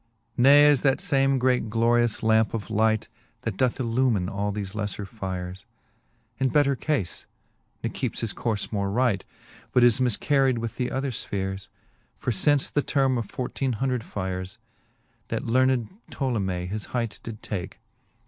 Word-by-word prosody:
VII. - - -1
Ne 145 +3 +8
is 145 -3 +5
that 135 -2 +2
fame 135 -1 +2
great 125 -3 +1
glorious 115 +1 +2
lampe 110 0 +3
of 110 -1 -5
light, 110 0 +2 0.3
That 115 -4 -3
doth 125 +3 +1
enlumine 115 -6 +1
all 100 +1 -1
thefe 100 -1 -4
lefler 105 -1 -3
fyres. 95 -2 -6 0.7
In 135 -1 +2
better 140 0 +3
cafe, 130 - -2 0.6
ne - - 0
keepes - - -3
his 115 -3 -2
courfe 110 -4 -2
more 100 -1 0
right, 110 -2 +1 0.5
But 125 - +4
is 120 0 +5
mifcarried 130 +2 +2
with 115 +2 -4
other 135 0 -2
Ipheres. 95 -3 -3 0.5
For 125 - -1
lince 140 +7 +2
the 145 - +3
terme 135 -3 +1
of 110 - -4
fourteene 130 +2 -2
hundred 125 +1 -1
yercs^ 95 -2 -5 0.7
That - - -3
learned 130 -1 +2 0.2
Ptolomcee 100 -10 -1
his 105 +2 -4
hight 115 -3 -2
did 115 -1 -8
take. 95 -3 -5
115 Hz, 155 wpm, -26 LUFS, 100-130 Hz, 0.7 s, Ne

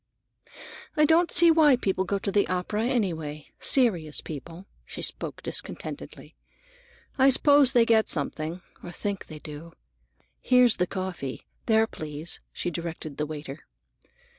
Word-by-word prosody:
"I 300 - +5
don't 335 +3 +3
see 340 -1 +6
why 310 -4 +5
people 190 -5 -1
go 200 - -1
to 200 0 -3
the 205 0 +2
opera, 185 +5 -2
anyway,—serious 170 - +1
people." 165 +5 -9 0.2
She - - -8
spoke - - -4
discontentedly. - - -5 0.9
"I 265 +1 +6
suppose 280 0 +5
they 240 -3 +5
get 225 -1 +3
something, 155 +3 -2 0.2
or 175 - -8
think 200 +1 -5
they 155 - -9
do. 155 +2 -10 0.7
Here's 250 -3 +4
the 180 - 0
coffee. 185 -9 -5 0.2
There, 220 -1 +4
please," 155 -4 -6
she 175 - -4
directed 165 -3 -6
the 150 - -2
waiter. 145 -2 -8
185 Hz, 135 wpm, -26 LUFS, 155-240 Hz, 0.9 s, see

